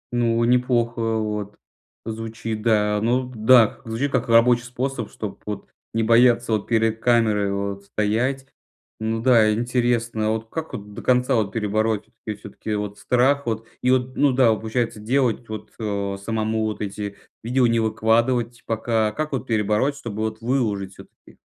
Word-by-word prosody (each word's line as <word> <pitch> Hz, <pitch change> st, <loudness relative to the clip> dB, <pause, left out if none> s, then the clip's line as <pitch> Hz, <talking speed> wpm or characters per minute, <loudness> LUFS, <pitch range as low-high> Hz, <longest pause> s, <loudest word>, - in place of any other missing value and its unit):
Ну, 115 Hz, -1 st, +2 dB
неплохо 120 Hz, -1 st, +2 dB, 0.2 s
вот 105 Hz, -1 st, -3 dB, 0.5 s
звучит, 110 Hz, -1 st, -5 dB
да. 105 Hz, -2 st, +2 dB
Ну, 125 Hz, +3 st, +2 dB
б 125 Hz, -, -12 dB
да. 115 Hz, 0 st, +5 dB
Звучит 125 Hz, +5 st, -2 dB
как 125 Hz, -2 st, 0 dB
рабочий 120 Hz, +1 st, +5 dB
способ, 125 Hz, -2 st, -4 dB
чтоб -, -, -7 dB
вот -, -, -5 dB, 0.3 s
не 115 Hz, -, +2 dB
бояться 120 Hz, +1 st, +4 dB
вот 105 Hz, -2 st, 0 dB
перед 115 Hz, -1 st, +1 dB
камерой 110 Hz, -4 st, +2 dB
вот 100 Hz, 0 st, -3 dB
стоять. 115 Hz, +7 st, -1 dB, 0.5 s
Ну 110 Hz, +1 st, -2 dB
да, 115 Hz, -4 st, +5 dB
интересно. 120 Hz, -1 st, 0 dB
А -, -, +2 dB
вот 110 Hz, 0 st, -2 dB
как 160 Hz, -1 st, -5 dB
вот 105 Hz, 0 st, -7 dB
до -, -, -7 dB
конца 125 Hz, +1 st, +2 dB
вот 110 Hz, -5 st, +1 dB
перебороть? 110 Hz, 0 st, 0 dB, 0.2 s
И 105 Hz, -, -1 dB
всё-таки 105 Hz, +1 st, -6 dB
вот 105 Hz, -1 st, -4 dB
страх 125 Hz, +5 st, +2 dB
вот? 110 Hz, 0 st, -2 dB, 0.2 s
И 125 Hz, -, +1 dB
вот, 130 Hz, 0 st, +1 dB
ну 145 Hz, -2 st, +3 dB
да, 125 Hz, -3 st, +4 dB
получается 110 Hz, +1 st, -2 dB
делать 120 Hz, 0 st, 0 dB
вот, 110 Hz, -1 st, -7 dB
э, 100 Hz, -2 st, -2 dB
самому 110 Hz, 0 st, -1 dB
вот 110 Hz, -1 st, -3 dB
эти 100 Hz, 0 st, -4 dB, 0.3 s
видео, 125 Hz, +2 st, +2 dB
не 115 Hz, -1 st, +2 dB
выкладывать 115 Hz, +2 st, +1 dB
пока. 110 Hz, -1 st, 0 dB
Как 155 Hz, +3 st, -3 dB
вот 130 Hz, -1 st, -3 dB
перебороть, 110 Hz, +5 st, +1 dB
чтобы 110 Hz, -6 st, -6 dB
вот 110 Hz, +1 st, -3 dB
выложить 105 Hz, -6 st, -1 dB
всё-таки? -, -, -17 dB
115 Hz, 165 wpm, -23 LUFS, 110-125 Hz, 0.5 s, да